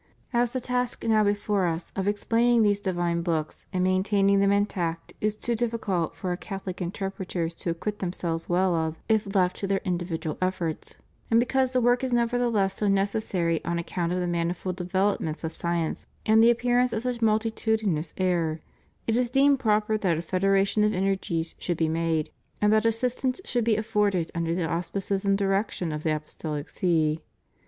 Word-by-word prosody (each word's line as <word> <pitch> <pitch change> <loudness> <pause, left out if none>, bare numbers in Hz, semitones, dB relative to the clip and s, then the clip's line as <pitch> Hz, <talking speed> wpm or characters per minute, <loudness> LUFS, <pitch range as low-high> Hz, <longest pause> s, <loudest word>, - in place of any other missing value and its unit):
As 240 0 +2
the 255 - -2
task 250 0 -2
now 220 -1 +4
before 205 -2 +1
Us 165 +1 -3
of 195 0 -1
explaining 230 +3 +3
these 205 -1 +3
divine 175 -3 -1
books 160 -3 -3
and 185 -1 0
main 185 0 +3
taining 200 -1 +3
them 200 0 +4
intact 180 -5 -1
is 215 0 +1
too 235 +2 -2
difficult 220 -8 -1
for 185 - -3
Our 175 - -1
Catholic 195 -2 -6
inter 190 +2 -3
preters 175 -3 -3
to - - -3
acquit 205 +5 -3
themselves 170 -3 -3
well 180 +1 +2
of, 160 -1 -1
if 215 -2 +1
left 180 -2 +2
to 200 - -3
their 195 0 +1
indi 175 -2 0
vidual 160 -3 -4
efforts, 180 -3 -2 0.3
and 230 - +5
because 260 +1 +1
the 255 -1 +2
work 245 +2 +3
is 255 -2 -1
nevertheless 235 -5 +1
so 210 - 0
necessary 195 -4 0
on 170 0 -1
account 170 0 -2
of 180 - 0
the 180 - -1
manifold 175 +1 -2
developments 180 -3 -1
of 160 - -2
science 170 -1 -2 0.2
and 220 +1 +5
the 230 - +7
appearance 245 +1 +2
of 220 - 0
such 250 -2 -2
multitudinous 220 -6 0
error, 170 -4 0 0.5
it 225 - +1
is 245 0 +1
deemed 275 +2 +4
proper 215 -2 +2
that 180 -6 +1
a 165 - -3
federation 195 +3 +2
of 210 -1 +2
energies 185 -4 -1
should 175 -2 -2
be 160 - +2
made, 160 -1 0 0.3
and 210 0 +3
that 220 +1 +3
assistance 250 +4 0
should 240 -1 0
be 225 -1 +3
afforded 210 -6 0
under 170 0 -1
the 175 -2 0
auspices 190 +4 -2
and 195 0 +3
direction 195 -3 0
of 150 0 -4
the 160 - -1
Apostohc 155 -1 -4
See. 160 -3 +1
195 Hz, 185 wpm, -26 LUFS, 170-220 Hz, 0.5 s, the